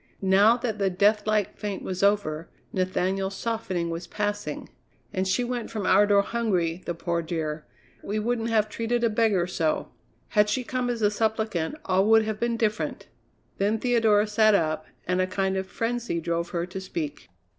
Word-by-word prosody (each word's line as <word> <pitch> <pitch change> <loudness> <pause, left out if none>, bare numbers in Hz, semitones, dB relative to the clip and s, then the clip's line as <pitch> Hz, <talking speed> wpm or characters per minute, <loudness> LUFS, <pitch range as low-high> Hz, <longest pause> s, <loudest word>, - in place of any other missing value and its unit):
Now 200 +5 +5
that 225 -3 -3
the 195 -1 +2
deathlike 210 +2 +2
faint 205 -2 -4
was 185 -1 -4
over, 195 -6 +1 0.2
Nathaniel's 190 +1 -1
softening 190 -6 -2
was 170 +1 -5
passing. 205 +2 -3 0.5
"And 185 -1 0
she 190 +6 +1
went 245 -1 -3
from 215 -4 -4
our 200 +3 +5
door 200 -1 +4
hungry, 185 -7 -1
the 175 - -2
poor 170 0 -1
dear! 160 -2 -4 0.3
We 210 - -3
wouldn't 230 +1 -1
have 215 -2 +2
treated 230 +2 -1
a 230 - +3
beggar 210 -5 +2
so." 165 -3 -1 0.4
"Had 210 -1 +3
she 250 +5 0
come 250 0 -2
as 235 -2 -2
a 205 - +4
suppliant, 220 - -1
all 190 +1 +2
would 225 0 +6
have 215 -1 -3
been 235 -1 0
different." 215 -1 -2 0.5
Then 205 +3 +2
Theodora 225 -3 +3
sat 215 0 +4
up, 155 -3 0 0.2
and 180 +1 +1
a 185 - +1
kind 190 0 -1
of 190 0 -2
frenzy 230 -4 -2
drove 170 +1 -2
her 170 -1 -2
to 185 +1 -7
speak. 160 - -5
205 Hz, 175 wpm, -26 LUFS, 180-220 Hz, 0.5 s, would